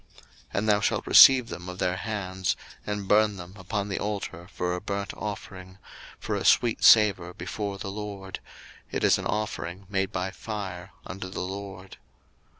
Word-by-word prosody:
02:029:025 - - -24 0.3
And 110 +2 0
thou 105 -1 +4
shalt - - 0
receive 130 -3 +8
them 90 +1 -7
of 90 - -7
their 90 -1 0
hands, 95 -3 -2 0.3
and 105 -1 -3
burn 105 0 +4
them 90 -1 -9
upon 100 +1 -3
the 100 - -3
altar 100 -4 -4
for 90 0 -2
a 90 - -4
burnt 100 0 -4
offering, 95 -3 -7 0.4
for - - -3
a - - -2
sweet 120 -2 +3
savour 95 -5 +6
before 100 +3 -4
the 100 0 -5
LORD: 100 -2 -6 0.5
it - - -2
is - - +4
an - - -3
offering 100 -3 -3
made 95 -1 0
by 90 +2 -2
fire 95 -3 -6
unto 95 0 -6
the 95 - -5
LORD. 95 0 -7
95 Hz, 170 wpm, -27 LUFS, 95-105 Hz, 0.5 s, receive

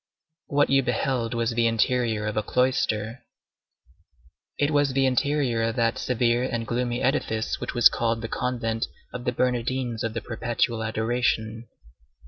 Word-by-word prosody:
What 145 0 +2
you 135 0 +5
beheld 125 -1 -1
was 115 0 0
the 115 0 +2
interior 115 -1 +1
of 105 - -2
a 110 - +2
cloister. 115 -1 0 1.4
It 145 +1 +1
was 145 -2 +2
the 135 0 +3
interior 130 -2 +1
of 115 0 0
that 115 -1 +1
severe 120 -1 +1
and 120 -3 -2
gloomy 120 +1 -1
edifice 115 -5 0
which - - -4
was 120 - +8
called 115 -1 -1
the - - -2
Convent 115 -2 -2 0.3
of 125 0 -6
the 125 - +1
Bernardines 125 -1 -1
of 115 -1 -3
the 115 - -2
Perpetual 120 0 -1
Adoration. 110 0 -1
120 Hz, 150 wpm, -25 LUFS, 115-125 Hz, 1.4 s, was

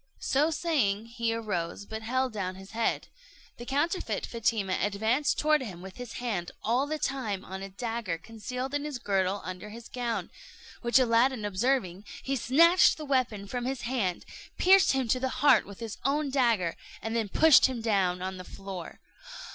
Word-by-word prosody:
So 290 +4 +2
saying, 265 - 0
he 230 0 -2
arose, 200 -5 -3
but 220 +1 -6
held 255 +2 -1
down 185 -3 -3
his 195 +1 -12
head. 230 +1 -1 0.5
The 240 - -9
counterfeit 325 +7 -1
Fatima 220 -5 0
advanced 220 +8 +1
toward 305 -1 +3
him, 185 -8 -7
with 190 0 -10
his 245 -2 -7
hand 205 -8 -3
all 250 +5 +1
the 310 +1 -2
time 250 -10 -2
on 190 0 -7
a 195 - -6
dagger 225 -3 -3
concealed 250 +8 -6
in 290 0 -1
his 295 -3 -4
girdle 195 -3 0
under 185 +3 -6
his 230 +2 -10
gown; 240 -2 -3 0.5
which 240 +2 +3
Aladdin, 240 -1 +3
observing, 205 -2 0 0.2
he 275 - -1
snatched 335 +9 +5
the 310 - -6
weapon 255 -7 0
from 245 +4 -4
his 265 0 -2
hand, 235 -8 -2 0.3
pierced 380 -2 +6
him 265 -2 0
to 255 +3 +2
the 260 +1 -1 0.2
heart 290 - +6
with 200 -1 -11
his 225 -3 -6
own 280 +1 0
dagger, 230 -10 +2 0.3
and 225 +1 -3
then 225 -3 0
pushed 315 +6 +6
him 260 -2 -4
down 190 -5 +1
on 190 0 -4
the 185 - -7
floor. 190 -2 -8
230 Hz, 180 wpm, -29 LUFS, 200-265 Hz, 0.5 s, pierced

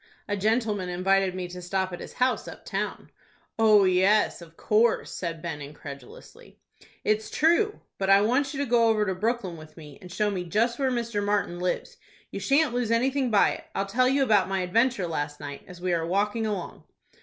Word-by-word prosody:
"A 205 - -1
gentleman 210 -2 0
invited 190 +1 +1
me 185 -1 -4
to 180 0 -8
stop 185 +1 -2
at 175 - -6
his - - -9
house 255 0 0
up - - -10
town." - - -4 0.5
"Oh, 215 -2 +6
yes, 190 +2 +3
of 165 -1 -14
course," 220 +2 +2
said 165 -3 -5
Ben, 155 -4 -4
incredulously. 140 -2 -11 0.5
"It's 215 0 0
true. 345 +7 +2 0.2
But 195 0 -1
I 195 0 +7
want 255 +6 +1
you 280 - -5
to - - 0
go 235 -2 +3
over 215 -1 +2
to 190 - -1
Brooklyn 200 -3 -2
with 155 0 -14
me, 150 +2 -12
and 180 -2 -11
show 210 +2 0
me 185 -3 -3
just 230 +8 0
where 270 -1 +2
Mr. 235 -4 -2
Martin 200 -4 -1
lives. 180 - -3 0.3
You - - -5
shan't 280 -1 +2
lose 245 -2 -1
anything 255 +3 +1
by 210 -3 +4
it. - - -7
I'll 195 - 0
tell 255 +6 +2
you 275 +1 +2
about 205 -7 +3
my 195 -1 0
adventure 225 +2 +1
last 145 -3 -3
night, 145 -1 -7
as 180 -1 -11
we 180 -1 0
are 165 -1 0
walking 205 +4 0
along." 200 -5 -5
205 Hz, 200 wpm, -26 LUFS, 180-235 Hz, 0.5 s, I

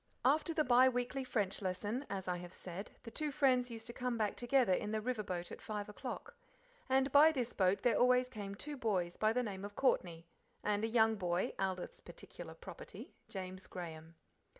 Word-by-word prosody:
After 305 +5 +4
the 315 -2 +2
bi 255 0 +6
weekly 245 +2 -2
French 210 -7 -1
lesson, 205 +8 -2
as 190 -2 -4
I 180 -1 0
have 175 0 -9
said, 185 +3 -6
the 230 - -8
two 305 +6 -1
friends 255 -3 +3
used 225 -1 -7
to 235 - -6
come 250 -1 -2
back 210 -2 0
together 245 -4 +3
in 210 +3 -1
the 220 - 0
river 235 0 -1
boat 180 -4 -4
at - - -8
five 210 -1 -4
o'clock. 260 - -6 0.6
And 265 +1 +3
by 300 +3 +8
this 250 -6 -2
boat 190 0 +2
there 245 -2 +3
always 250 0 +5
came 205 -5 -6
two 290 +7 -5
boys 185 -8 0
by 215 0 +3
the 250 +2 +1
name 195 -4 -5
of 205 0 -7
Courtney, 175 -11 +1 0.4
and 210 0 +1
a 225 - 0
third 220 -2 +4
boy, 175 -1 0
Aldith's 190 -2 -2
particular - - -10
property, - - -10 0.2
James 185 -1 -6
Graham. 165 -2 -7
220 Hz, 195 wpm, -36 LUFS, 190-255 Hz, 0.6 s, by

